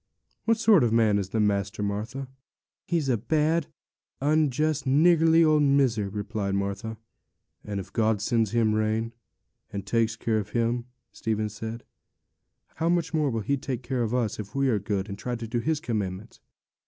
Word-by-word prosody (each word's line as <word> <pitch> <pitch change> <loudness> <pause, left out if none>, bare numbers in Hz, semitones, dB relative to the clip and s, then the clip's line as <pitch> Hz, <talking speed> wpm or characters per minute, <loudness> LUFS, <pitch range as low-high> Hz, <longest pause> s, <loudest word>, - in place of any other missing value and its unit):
What 225 -1 +3
sort 220 - +5
of 120 - +3
a - - +2
man 110 -3 +4
is 95 -2 -4
the 110 - -1
master, 100 0 0
Martha?' 110 +7 -3 0.6
'He's 165 -5 0
a 125 -3 +2
bad, 155 +7 +1 0.5
unjust, 150 0 +1
niggardly 165 +3 +5
old 155 -1 +4
miser,' 135 -8 +2
replied 100 -1 -3
Martha. 100 +3 -3 0.7
'And 100 -1 -4
if 95 - -9
God 110 -2 +2
sends 110 +1 +1
him 115 -1 +2
rain, 110 +2 0 0.6
and 100 -1 -5
takes 115 +2 +1
care 110 0 0
of 105 - -7
him,' 120 +1 0 0.3
Stephen 110 -1 -2
said, 110 +3 -6 0.9
'how 165 - +1
much 170 -2 0
more 155 -2 +2
care - - -2
will 115 -1 -1
He 140 +7 0
take 130 -1 -5
of 120 -2 0
us, 115 -5 -1
if 105 +2 -7
we 135 -1 +2
are 110 -4 +2
good, 100 0 -2
and 100 -1 -7
try 125 +2 -3
to 115 -1 -6
do 120 +2 -1
His 155 +5 0
commandments!' 105 -4 -4
115 Hz, 180 wpm, -26 LUFS, 105-140 Hz, 0.9 s, sort